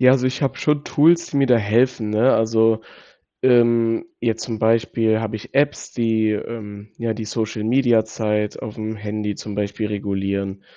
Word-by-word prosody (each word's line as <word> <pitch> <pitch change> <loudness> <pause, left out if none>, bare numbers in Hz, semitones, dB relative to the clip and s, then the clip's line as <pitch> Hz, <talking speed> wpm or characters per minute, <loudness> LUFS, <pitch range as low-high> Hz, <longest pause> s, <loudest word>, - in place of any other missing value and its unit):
Ja, 130 0 +6
also 130 -1 +2
ich 130 +3 -2
habe 135 - 0
schon 150 -1 0
Tools, 170 +3 +3
die 140 - -3
mir 140 - +3
da 125 -2 +5
helfen, 115 +1 +1
ne, 110 +5 +3
also, 110 0 +2 0.6
ähm, 120 0 +3 0.2
jetzt 115 -1 -1
zum 115 -3 -5
Beispiel 110 0 +2
habe 110 -1 -3
ich 110 - -10
Apps, 145 +1 0
die, 110 -2 +1
ähm, 105 -1 -6
ja, 115 -1 -2
die 110 0 -6
Social-Media-Zeit 110 -1 0
auf'm 110 +1 -5
Handy 105 0 -4
zum 105 -2 -7
Beispiel 105 +1 -2
regulieren, 100 -1 -3
110 Hz, 160 wpm, -21 LUFS, 105-120 Hz, 0.6 s, Ja